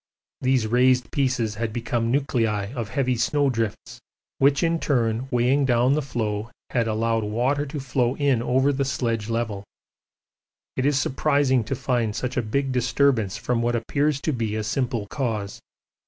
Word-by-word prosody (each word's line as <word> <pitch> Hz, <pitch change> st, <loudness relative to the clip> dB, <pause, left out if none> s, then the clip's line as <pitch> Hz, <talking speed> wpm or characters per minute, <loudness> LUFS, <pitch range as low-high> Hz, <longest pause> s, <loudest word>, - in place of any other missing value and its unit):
These 130 Hz, -3 st, +2 dB
raised 125 Hz, +1 st, +3 dB
pieces 130 Hz, -6 st, 0 dB
had 115 Hz, -2 st, -1 dB
become 115 Hz, 0 st, -1 dB
nuclei 115 Hz, -6 st, 0 dB
of 115 Hz, -5 st, -4 dB
heavy 130 Hz, +3 st, 0 dB
snow 140 Hz, +4 st, +1 dB
drifts, 115 Hz, -3 st, -4 dB, 0.4 s
which 140 Hz, +4 st, +3 dB
in 165 Hz, 0 st, +1 dB
turn 120 Hz, -4 st, 0 dB
weighing 125 Hz, +3 st, +2 dB
down 125 Hz, 0 st, +3 dB
the 155 Hz, -, +1 dB
floe 110 Hz, -5 st, -3 dB, 0.2 s
had 115 Hz, -2 st, +1 dB
allowed 115 Hz, 0 st, 0 dB
water 125 Hz, +7 st, 0 dB
to 145 Hz, +2 st, -5 dB
flow 125 Hz, -1 st, 0 dB
in 140 Hz, -5 st, +2 dB
over 130 Hz, +4 st, +2 dB
the 140 Hz, +1 st, 0 dB
sledge 115 Hz, -4 st, -2 dB
level. 115 Hz, -4 st, -2 dB, 1.1 s
It 130 Hz, +1 st, +1 dB
is 145 Hz, -2 st, +2 dB
surprising 135 Hz, -2 st, +2 dB
to 135 Hz, -, -2 dB
find 120 Hz, -4 st, -1 dB
such 125 Hz, 0 st, -3 dB
a 125 Hz, -, +2 dB
big 135 Hz, +5 st, -1 dB
disturbance 125 Hz, -4 st, +1 dB
from 125 Hz, -1 st, -1 dB
what 120 Hz, 0 st, +1 dB
appears 140 Hz, +5 st, 0 dB
to 155 Hz, -, -1 dB
be 115 Hz, -4 st, -2 dB
a 110 Hz, -, -2 dB
simple 120 Hz, -1 st, -1 dB
cause. 105 Hz, -4 st, -3 dB
125 Hz, 165 wpm, -24 LUFS, 115-135 Hz, 1.1 s, raised